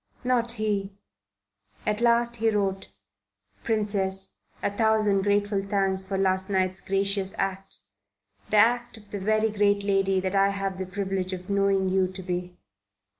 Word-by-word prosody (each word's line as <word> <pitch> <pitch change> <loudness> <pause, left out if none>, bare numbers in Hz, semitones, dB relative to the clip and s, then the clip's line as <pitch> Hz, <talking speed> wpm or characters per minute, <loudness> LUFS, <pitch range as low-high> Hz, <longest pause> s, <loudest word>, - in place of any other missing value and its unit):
Not 240 -2 +1
he.... 205 -3 -2 0.9
At 210 +1 0
last 235 0 +3
he 225 0 +2
wrote: 195 -3 -1 0.8
PRINCESS, 200 -3 -1 0.3
A - - +1
thousand 215 -3 +2
grateful 205 0 +1
thanks 195 -1 0
for 190 0 -3
last 190 0 +1
night's 185 -1 0
gracious 195 0 0
act 195 0 -3 0.7
the 215 - +2
act 240 +2 +3
of 205 -2 -17
the 205 - -4
very 215 +2 +1
great 205 -1 +2
lady 195 -1 +2
that 185 0 -2
I 195 0 +4
have 195 -1 -3
the 190 - -3
privilege 190 -1 -3
of 185 +1 -6
knowing 195 -1 +2
you 185 0 +2
to 185 +1 -9
be. 180 0 -4
195 Hz, 150 wpm, -26 LUFS, 190-210 Hz, 0.9 s, I